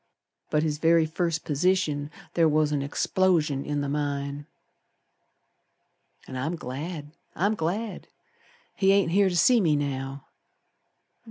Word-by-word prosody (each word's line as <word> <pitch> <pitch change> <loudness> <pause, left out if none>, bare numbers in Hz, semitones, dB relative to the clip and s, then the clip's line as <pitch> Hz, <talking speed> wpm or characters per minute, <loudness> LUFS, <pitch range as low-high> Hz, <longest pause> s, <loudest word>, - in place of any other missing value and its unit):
But 150 0 +1
his 150 -2 -1
very 165 0 +4
first 165 0 -2
position 150 -2 +1 0.2
ther 165 -1 +4
was 155 -1 +2
an 145 -2 0
explosion 150 -1 +1
in 145 -1 -2
the 140 - -2
mine. 145 0 -3 1.8
And 130 - -6
I'm 155 +7 -2
glad! 150 +2 -6 0.2
I'm 200 +4 +1
glad! 205 +4 -3 0.7
He 195 -1 +4
ain't 195 -4 +2
here 195 +1 +4
to 175 - -1
see 240 +6 +5
me 160 -5 +3
now. 135 -1 -3
155 Hz, 125 wpm, -26 LUFS, 145-180 Hz, 1.8 s, see